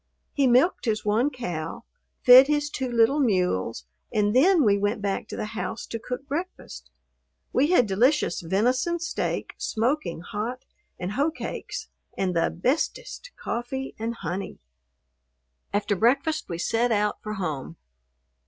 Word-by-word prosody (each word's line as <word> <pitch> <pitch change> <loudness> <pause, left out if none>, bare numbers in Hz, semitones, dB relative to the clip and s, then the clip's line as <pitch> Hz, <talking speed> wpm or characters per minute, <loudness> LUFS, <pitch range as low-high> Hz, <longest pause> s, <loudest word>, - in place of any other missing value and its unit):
He 280 -2 +3
milked 255 +9 +3
his 215 -2 -1
one 220 +7 +2
cow, 180 - -5 0.4
fed 255 +2 +9
his 295 0 0
two 260 -3 -3
little 235 +5 +3
mules, 180 - 0 0.3
and 210 -1 +1
then 335 +4 +5
we 205 -3 +4
went 205 +2 0
back 200 -1 -2
to - - -7
the - - -2
house 225 - -4
to 230 - -5
cook 250 +4 -6
breakfast. 335 +7 -6 0.6
We 275 +3 +3
had 330 -8 +4
delicious 235 - +2
venison 250 - +1
steak, 330 - -3
smoking 230 - -1
hot, 220 +8 -5 0.3
and 180 +1 -4
hoe 280 +8 +1
cakes 320 - -6 0.3
and 185 -2 0
the 165 - +2
"bestest" 325 - -2
coffee, 265 +3 -4
and 230 +1 -3
honey. 195 -3 -5 1.1
After 205 0 0
breakfast 275 - +1
we 170 - -3
set 230 +7 +1
out 210 -1 0
for 215 - -5
home. 150 - -4
235 Hz, 145 wpm, -25 LUFS, 200-275 Hz, 1.1 s, fed